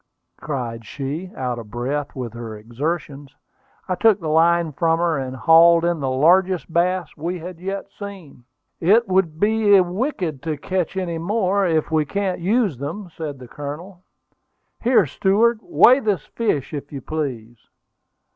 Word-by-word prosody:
cried 120 Hz, -6 st, -4 dB
she, 140 Hz, -, -5 dB
out 125 Hz, -2 st, -3 dB
of 110 Hz, -2 st, -10 dB
breath 140 Hz, +5 st, -3 dB
with 125 Hz, -4 st, -5 dB
her 115 Hz, -2 st, -7 dB
exertions. 140 Hz, +4 st, -5 dB, 0.5 s
I 185 Hz, -, 0 dB
took 210 Hz, +2 st, +3 dB
the 160 Hz, -4 st, -4 dB
line 165 Hz, +1 st, +3 dB
from 165 Hz, +3 st, +1 dB
her, 165 Hz, -3 st, 0 dB
and 130 Hz, -1 st, -5 dB
hauled 165 Hz, +4 st, +6 dB
in 170 Hz, -2 st, 0 dB
the 135 Hz, -2 st, -1 dB
largest 175 Hz, +5 st, +2 dB
bass 180 Hz, -1 st, 0 dB
we 170 Hz, +4 st, -3 dB
had 175 Hz, 0 st, -9 dB
yet 195 Hz, +2 st, -4 dB
seen. 190 Hz, -, -10 dB, 0.4 s
"It 215 Hz, +7 st, +4 dB
would 185 Hz, -4 st, +1 dB
be 210 Hz, -1 st, +4 dB
wicked 180 Hz, -, -2 dB
to 155 Hz, 0 st, -3 dB
catch 185 Hz, +4 st, -2 dB
any 170 Hz, -3 st, -2 dB
more, 195 Hz, +1 st, +1 dB
for -, -, -10 dB
we 155 Hz, -1 st, +2 dB
can't 195 Hz, +2 st, -2 dB
use 195 Hz, -, +1 dB
them," 170 Hz, +7 st, -6 dB
said 150 Hz, -4 st, -5 dB
the 125 Hz, -1 st, -11 dB
Colonel. 150 Hz, +7 st, -8 dB, 0.8 s
"Here, 235 Hz, -5 st, +4 dB
steward, 210 Hz, -, +2 dB
weigh 270 Hz, -5 st, +5 dB
this 205 Hz, -, -1 dB
fish, 180 Hz, -, -2 dB
if 145 Hz, -1 st, -6 dB
you 140 Hz, -2 st, -6 dB
please." 125 Hz, -7 st, -4 dB
165 Hz, 155 wpm, -21 LUFS, 140-190 Hz, 0.8 s, hauled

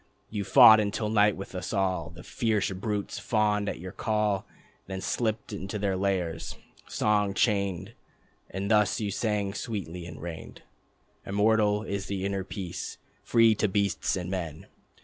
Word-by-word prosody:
You 105 Hz, -2 st, -2 dB
wrought 110 Hz, 0 st, +10 dB
until 105 Hz, +1 st, -1 dB
night 105 Hz, -1 st, +3 dB
with 95 Hz, -, -8 dB
us 90 Hz, 0 st, -4 dB
all. 95 Hz, -3 st, 0 dB
The 85 Hz, 0 st, -12 dB
fierce 110 Hz, -4 st, 0 dB
brutes 100 Hz, +2 st, -3 dB
fawned 105 Hz, -3 st, +1 dB
at -, -, -4 dB
your 90 Hz, +2 st, -7 dB
call, 105 Hz, -2 st, 0 dB, 0.4 s
Then 95 Hz, 0 st, -4 dB
slipped 110 Hz, +2 st, -2 dB
to 100 Hz, 0 st, -5 dB
their 100 Hz, -2 st, 0 dB
lairs, 95 Hz, -4 st, -2 dB, 0.3 s
song 105 Hz, -2 st, +1 dB
chained. 100 Hz, -1 st, 0 dB, 0.6 s
And 100 Hz, +3 st, -3 dB
thus 105 Hz, -3 st, +3 dB
you 105 Hz, -2 st, -2 dB
sang 105 Hz, -2 st, -1 dB
sweetly, 95 Hz, -6 st, -5 dB
and -, -, -9 dB
reigned: 85 Hz, -1 st, -8 dB, 0.6 s
"Immortal 105 Hz, +1 st, +2 dB
is 100 Hz, -2 st, -4 dB
the 95 Hz, -1 st, -3 dB
inner 100 Hz, -1 st, -1 dB
peace, 95 Hz, -3 st, -6 dB, 0.2 s
free 115 Hz, -1 st, +4 dB
to 105 Hz, 0 st, +1 dB
beasts 100 Hz, 0 st, 0 dB
and 90 Hz, -1 st, -4 dB
men. 85 Hz, -5 st, -4 dB
100 Hz, 150 wpm, -28 LUFS, 95-105 Hz, 0.6 s, wrought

